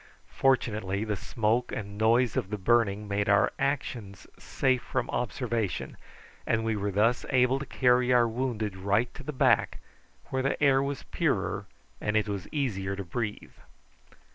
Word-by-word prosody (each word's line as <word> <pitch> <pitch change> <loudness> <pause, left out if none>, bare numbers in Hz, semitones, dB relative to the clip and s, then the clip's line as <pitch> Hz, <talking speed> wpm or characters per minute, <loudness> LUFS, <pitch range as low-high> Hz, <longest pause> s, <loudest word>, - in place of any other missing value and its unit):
Fortunately 110 -7 +1
the 105 -1 -2
smoke 115 +4 -1
and 100 -1 -5
noise 115 +2 +3
of 95 - -1
the 105 - -3
burning 105 0 +2
made 100 0 -1
our 100 -1 +4
actions 125 -8 -3
safe 130 -2 0
from 125 +1 -2
observation, 120 -4 -2 0.5
and 110 0 +1
we 115 -1 0
were 100 0 -2
thus 110 +5 +2
able 130 0 +3
to 140 - -6
carry 125 -1 +3
our 120 -1 +5
wounded 115 -4 -2
right 100 +5 0
to - - -9
the 150 - -5
back, 130 - +2 0.5
where 130 - 0
the 135 - -1
air 135 -2 +4
was 140 -1 -3
purer - - -1 0.3
and 105 +1 +1
it 105 - +1
was 100 -3 -4
easier 100 -10 -2
to 100 - -5
breathe. 105 +4 -4
115 Hz, 160 wpm, -28 LUFS, 100-125 Hz, 0.5 s, our